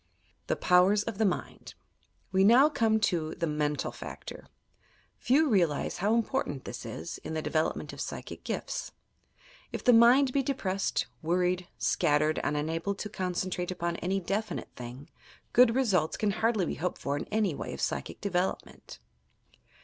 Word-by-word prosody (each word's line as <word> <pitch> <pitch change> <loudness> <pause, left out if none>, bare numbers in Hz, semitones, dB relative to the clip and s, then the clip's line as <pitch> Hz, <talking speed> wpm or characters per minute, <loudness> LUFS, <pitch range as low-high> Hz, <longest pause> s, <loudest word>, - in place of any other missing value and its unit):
THE - - +1
POWERS 185 +4 +4
OP 225 -4 -3
THE 220 - +3
MIND 180 - -4 0.6
We 190 0 +3
now 245 +8 +7
come 225 -6 +2
to 165 -6 0
the 170 - -1
mental 150 -1 -1
factor. - - -9 0.7
Few 300 +5 +3
realize 175 - +1
how 210 +5 +2
important 230 - -1
this - - -7
is, 80 - -6
in 160 - -6
the 155 - -1
development 160 0 -1
of - - -10
psyehie - - -6
gifts. - - -4 0.8
If - - -5
the 245 - +6
mind 250 +3 +6
be 280 - +3
depressed, 200 -8 -1 0.2
worried, 180 +2 0
scattered 150 +1 +2
and 150 - 0
unable 165 +6 -2
to 210 - -5
concentrate 180 -2 -2
upon 170 -2 -2
any 190 +2 -1
definite 200 +2 -3
thing, 125 +3 -9 0.5
good 245 -1 +6
results 195 -12 +1
can 210 -1 +1
hardly 215 -2 +1
be - - -2
hoped 180 0 -2
for 140 - -2
in 215 +9 -1
the 190 -6 0
way - - -5
of - - -7
psychic - - -3
development! 185 -2 -3
185 Hz, 155 wpm, -29 LUFS, 165-220 Hz, 0.8 s, now